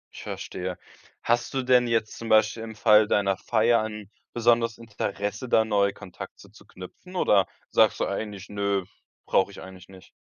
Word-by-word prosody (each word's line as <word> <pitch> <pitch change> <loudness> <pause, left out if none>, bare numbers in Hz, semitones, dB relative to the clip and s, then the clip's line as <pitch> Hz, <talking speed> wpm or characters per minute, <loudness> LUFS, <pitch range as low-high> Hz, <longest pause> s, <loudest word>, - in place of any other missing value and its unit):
Ich - - -9
verstehe. 90 0 -5 0.5
Hast 120 +1 0
du 135 - 0
denn 125 -1 +4
jetzt 115 -2 -1
zum 115 - -6
Beispiel 110 +1 +3
im 110 -1 -8
Fall 105 0 +5
deiner 100 -2 +2
Feier 115 +2 +2
'n 105 -2 -7 0.2
besonderes 115 -1 +2
Interesse, 105 +1 -4
da 110 -1 +4
neue 100 -2 +2
Kontakte 90 -2 -11
zu - - -18
knüpfen? 95 - -12
Oder 100 - +3 0.2
sagst - - +4
du - - +1
eigentlich: 100 -1 -5
„Nö, 100 -2 -1 0.4
brauche - - +2
ich - - -11
eigentlich 95 -1 -12
nicht.“? 95 -2 -15
105 Hz, 170 wpm, -26 LUFS, 100-115 Hz, 0.5 s, Fall